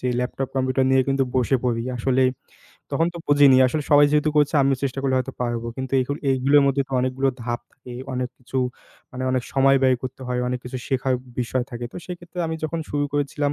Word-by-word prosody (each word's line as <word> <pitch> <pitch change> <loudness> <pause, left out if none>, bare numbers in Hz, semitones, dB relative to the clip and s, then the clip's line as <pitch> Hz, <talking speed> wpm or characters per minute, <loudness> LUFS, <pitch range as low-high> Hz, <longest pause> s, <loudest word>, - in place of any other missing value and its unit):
যে 125 - -1
laptop 130 +1 -3
computer 130 0 +1
নিয়ে 130 0 +5
কিন্তু 135 -1 +2
বসে 130 +1 +2
পড়ি, 115 -2 0
আসলে 130 +2 +1 0.7
তখন 165 - +1
তো - - -6
বুঝিনি 145 -2 +6
আসলে 150 +4 -1
সবাই 145 0 +7
যেহেতু 150 0 +3
করছে 150 +1 +3
আমিও 135 0 +2
চেষ্টা 135 -1 -2
করলে 135 -1 +1
হয়তো 130 +1 -3
পারবো 120 -1 -2
কিন্তু 130 0 -5
এগুকু 130 +3 -2 0.2
এগুলোর 135 +2 +4
মধ্যে 140 0 +2
তো - - -11
অনেকগুলো 130 +2 0
ধাপ 120 0 -3
থাকে 125 -2 -12 0.2
অনেক 125 -1 -2
কিছু 130 +1 -4 0.5
মানে 130 0 -6
অনেক 130 -1 0
সময় 135 0 +4
ব্যয় 130 -1 +4
করতে 130 0 -6
হয় 125 0 -1
অনেক 125 0 -2
কিছু 125 +1 -5
শেখার 130 0 +1 0.3
বিষয় 125 +1 -1
থাকে 120 0 -6
তো - - -9
সেক্ষেত্রে 175 0 -9
আমি 160 - -2
যখন 165 +2 -2
শুরু 145 0 0
করেছিলাম, 145 0 0
130 Hz, 210 wpm, -23 LUFS, 125-140 Hz, 0.7 s, সবাই